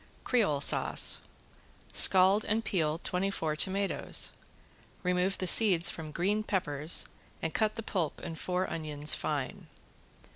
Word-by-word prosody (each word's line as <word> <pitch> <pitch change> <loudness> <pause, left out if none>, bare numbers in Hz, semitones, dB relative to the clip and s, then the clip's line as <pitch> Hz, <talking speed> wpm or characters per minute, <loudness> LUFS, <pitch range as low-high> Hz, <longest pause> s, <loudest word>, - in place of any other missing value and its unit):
~CREOLE 200 - 0
SAUCE~ - - +2 0.7
Scald 190 +3 +5
and 220 +2 -2
peel 155 -4 -1
twenty 180 +3 -1
four 160 -5 -3
tomatoes. 195 +5 +2 0.7
Remove 180 +1 -1
the 185 - -4
seeds 180 -2 +4
from 160 -2 -8
green 195 +7 -1
peppers 160 -7 +1 0.3
and 165 - -4
cut 215 -1 -1
the 225 - -6
pulp 175 -8 -3
and 165 -1 -8
four 180 +1 -2
onions 150 -2 -1
fine. 145 -4 -4
180 Hz, 125 wpm, -29 LUFS, 155-195 Hz, 0.7 s, Scald